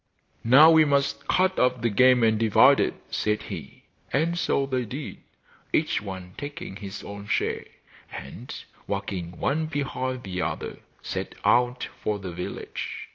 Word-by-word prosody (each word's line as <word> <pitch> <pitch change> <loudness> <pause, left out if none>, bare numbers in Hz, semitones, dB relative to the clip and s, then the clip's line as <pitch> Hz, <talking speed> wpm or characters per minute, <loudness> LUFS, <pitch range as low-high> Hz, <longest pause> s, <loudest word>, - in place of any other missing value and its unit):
'Now 140 +8 +8
we 160 -1 +7
must 140 -2 0
cut 185 +1 +2
up 125 -2 +2
the 115 - +2
game 125 +3 +5
and 110 -1 +3
divide 125 +5 +6
it,' - - +1 0.2
said 105 0 0
he; 80 -9 -8 0.3
and 160 +5 +1
so 140 -5 +1
they 130 -2 -1
did, 135 +6 -7 0.5
each - - +1
one 95 -3 -7
taking 145 -9 -6
his 100 -1 -7
own 100 0 -8
share; - - -1 0.5
and, 100 - -8 0.4
walking 90 -4 -4
one 155 +3 0
behind 130 -4 -3
the 90 -2 -4
other, - - -4 0.2
set - - -4
out 125 +1 +3
for 105 -1 -1
the 95 -2 -6
village. 90 +1 -6
125 Hz, 150 wpm, -26 LUFS, 100-140 Hz, 0.5 s, Now